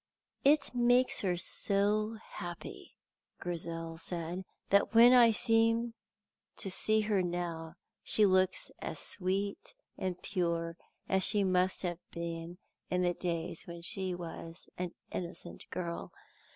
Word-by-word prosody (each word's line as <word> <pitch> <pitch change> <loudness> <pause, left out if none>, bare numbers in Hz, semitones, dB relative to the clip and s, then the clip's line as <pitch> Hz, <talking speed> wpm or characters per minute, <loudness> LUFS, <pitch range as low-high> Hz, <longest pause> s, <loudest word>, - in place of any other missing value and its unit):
"It 290 0 +4
makes 245 +1 +4
her 180 -3 0
so 210 +4 0
happy," 175 -1 -8 0.4
Grizel 165 -1 -3
said, 175 +2 -4 0.3
"that 200 +3 +3
when 240 +2 +9
I 240 -2 +8
seem 230 +1 +3 0.6
to 195 - -1
see 215 +3 +4
her 210 -2 +1
now 170 -2 -3 0.3
she 215 - +3
looks 185 -1 +2
as - - -5
sweet 195 - 0 0.2
and 185 -1 -2
pure 170 -3 -1 0.3
as 190 - +2
she 205 -2 +3
must 185 0 +2
have 175 -2 -2
been 170 0 -5 0.3
in 180 0 +1
the 175 0 +2
days 170 -1 -3
when 170 -1 -8
she 185 +1 -2
was 165 0 -8
an 180 -1 -4 0.2
innocent 175 0 -5
girl. 170 -2 -4
180 Hz, 125 wpm, -32 LUFS, 170-210 Hz, 0.6 s, when